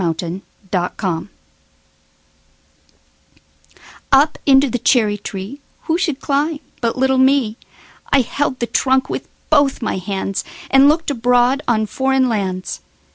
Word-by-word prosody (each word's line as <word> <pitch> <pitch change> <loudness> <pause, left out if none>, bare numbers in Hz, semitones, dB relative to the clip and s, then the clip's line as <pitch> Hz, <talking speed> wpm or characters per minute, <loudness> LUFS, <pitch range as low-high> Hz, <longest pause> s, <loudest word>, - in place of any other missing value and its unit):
9. 165 -2 0
Foreign 175 +2 -5 0.3
Lands 180 -1 -2 2.8
UP 285 +3 +4
into 275 0 +6
the 245 -1 -2
cherry 220 -3 +2
treeWho 210 +10 -6
should 315 -7 -1
climb 295 +2 -1 0.2
but 230 0 -1
little 265 0 +2
me?I 265 +1 0
held 260 +1 -2
the 235 - 0
trunk 260 +2 +1
with - - -4 0.2
both 285 -4 +3
my 200 - -2
handsAnd 195 +8 0
looked 310 +1 +2
abroad 245 +2 +2
on 220 -2 +2
foreign 265 +3 +1
lands. 190 -5 -3
255 Hz, 115 wpm, -18 LUFS, 205-275 Hz, 2.8 s, into